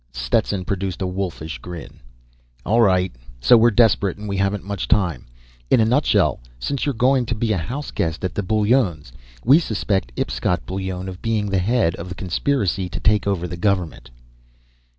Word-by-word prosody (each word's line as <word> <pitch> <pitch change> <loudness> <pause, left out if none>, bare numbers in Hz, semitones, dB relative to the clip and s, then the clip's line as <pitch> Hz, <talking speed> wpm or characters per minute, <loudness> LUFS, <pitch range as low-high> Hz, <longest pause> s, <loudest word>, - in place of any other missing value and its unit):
Stetson 65 +10 0
produced 95 -1 -3
a - - 0
wolfish 90 -4 -4
grin. 90 -4 -9 0.7
"All 115 +3 +3
right. 95 -4 +3 0.3
So 65 - +6
we're 115 +1 +6
desperate, 110 -4 +3
and 105 +1 -7
we 100 - -2
haven't 100 +1 0
much 100 -1 -4
time. 90 - +1 0.4
In - - +5
a 110 - +4
nutshell, 105 - +2 0.2
since 140 - -2
you're 140 - 0
going 125 +1 +2
to 120 - -1
be 110 0 0
a - - 0
house 130 - -5
guest 80 +2 -2
at 95 - -2
the - - -1
Bullones' 105 - +1 0.3
we 135 +7 +7
suspect 100 - -1
Ipscott - - -1
Bullone 95 +3 -4
of 95 0 -8
being 110 -3 -1
the 95 - +2
head 105 -3 +2
of 90 +2 -7
a - - -5
conspiracy 95 - -1
to - - -5
take 105 -2 +2
over 90 -3 -1
the 90 +1 -6
government." 95 -4 -1
100 Hz, 180 wpm, -21 LUFS, 90-110 Hz, 0.7 s, we